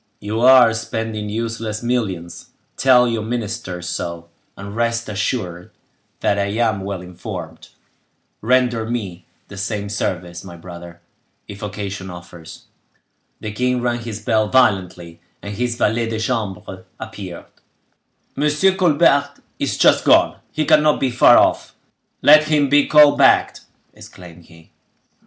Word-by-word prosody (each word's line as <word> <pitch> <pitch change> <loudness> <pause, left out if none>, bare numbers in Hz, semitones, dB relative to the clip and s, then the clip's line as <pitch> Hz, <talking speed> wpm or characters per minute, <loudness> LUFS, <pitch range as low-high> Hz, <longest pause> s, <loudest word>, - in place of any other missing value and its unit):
You 105 +2 -4
are 125 -2 +6
spending 110 -1 -4
useless 115 0 -4
millions; 100 -9 -3 0.3
tell 125 -2 +4
your 115 -2 -2
ministers 110 -6 -5
so; 85 -1 -5 0.3
and 100 +1 -9
rest 115 0 -1
assured 95 -4 -4 0.5
that 100 - +1
I 100 - +1
am 110 -1 -1
well 95 -2 -5
informed; 90 -2 -9 0.7
render 120 -1 +1
me 100 -7 -5 0.2
the 100 - -11
same 100 +1 -4
service, 90 -4 -4
my 90 -3 -10
brother, 85 0 -11 0.5
if 100 0 -10
occasion 100 -2 -6
offers." 85 -2 -12 0.8
The 105 - -5
king 125 +3 -1
rang 120 -1 -1
his 110 -3 -7
bell 110 0 0
violently, 90 -8 0 0.2
and 100 - -7
his 120 +3 -2
valet 115 0 0
de 110 -1 -3
chambre 105 -5 -4 0.2
appeared. 90 -4 -8 0.9
"Monsieur 150 +6 +2
Colbert 150 -6 +2 0.3
is - - -2
just - - +4
gone; - - +4
he 155 - -2
cannot 150 -1 +3
be 130 -2 0
far 120 - +6
off. - - +1 0.5
Let 155 +1 +7
him 150 -2 +1
be 145 0 +4
called 150 -1 +6
back!" - - +4 0.4
exclaimed 85 -2 -14
he. 80 -1 -19
110 Hz, 135 wpm, -19 LUFS, 95-120 Hz, 0.9 s, Let